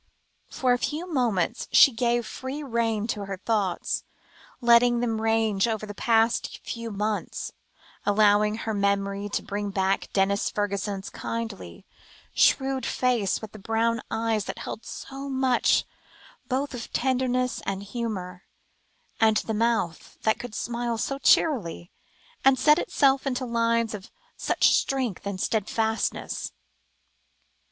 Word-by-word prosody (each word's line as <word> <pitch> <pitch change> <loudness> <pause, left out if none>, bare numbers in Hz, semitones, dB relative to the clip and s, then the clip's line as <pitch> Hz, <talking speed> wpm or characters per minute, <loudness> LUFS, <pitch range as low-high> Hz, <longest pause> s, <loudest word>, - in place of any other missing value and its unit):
For 255 -2 +1
a 245 - 0
few 310 +7 -2
moments 240 - 0
she 275 - +8
gave 240 0 0
free 265 +6 -6
rein 230 -4 0
to 210 -3 -3
her 195 -1 -5
thoughts, 200 -3 -1 0.6
letting 240 0 +5
them 225 -2 -1
range 225 -2 +2
over 220 -2 -2
the 205 - -7
past 225 +2 +1
few 230 -1 -5
months, 210 0 -3 0.5
allowing 210 0 +4
her 225 0 -3
memory 200 0 0
to - - -2
bring 205 0 -3
back 195 0 0
Denis 200 +1 +1
Fergusson's 200 -1 -3
kindly, 215 - -6 0.5
shrewd 265 -1 +3
face, 235 -5 0
with 215 - -7
the 215 - -11
brown 225 +3 0
eyes 225 -2 0
that - - -5
held 225 - -7
so 275 +1 -7
much 260 -2 +2 0.6
both 275 +2 -1
of 235 -2 -7
tenderness 255 -1 0
and 195 0 -2
humour, 200 -5 -5 0.7
and 220 -1 +4
the 220 - -2
mouth 220 -6 -1
that 220 - +2
could 245 -3 -7
smile 235 -1 -2
so 275 +4 -2
cheerily, 205 - +2 0.5
and 270 0 +5
set 300 +3 +5
itself 275 0 +2
into 255 -1 -1
lines 230 -1 +1
of 195 -2 -8 0.3
such - - +2
strength 255 -8 0
and 200 -2 -4
steadfastness. 220 +2 -1
225 Hz, 130 wpm, -26 LUFS, 205-245 Hz, 0.7 s, she